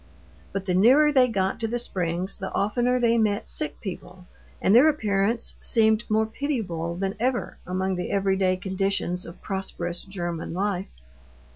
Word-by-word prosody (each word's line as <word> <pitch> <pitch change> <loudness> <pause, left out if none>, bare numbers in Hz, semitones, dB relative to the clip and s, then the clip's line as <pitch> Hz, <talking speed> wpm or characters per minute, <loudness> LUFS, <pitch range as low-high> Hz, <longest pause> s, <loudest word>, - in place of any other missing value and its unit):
But 195 -1 -3
the 185 - 0
nearer 260 +11 +6
they 260 -3 +5
got 195 -2 -1
to 225 - -1
the 240 +2 -1
springs 180 -4 -2
the 190 - -4
oftener 245 +5 +1
they 235 -1 +3
met 210 -1 +1
sick 305 - -3
people; 180 -2 -8 0.3
and 195 - +3
their 275 +6 +8
appearance 220 -4 0
seemed 220 0 +2
more 220 +1 +3
pitiable 215 - -3
than 195 +2 -2
ever 250 +1 -1
among 185 +1 -1
the 180 - -3
everyday 190 -1 +1
conditions 190 -1 -2
of 170 - -12
prosperous 180 -3 -3
German 175 -4 -5
life. 195 -1 -1
195 Hz, 155 wpm, -25 LUFS, 185-230 Hz, 0.3 s, their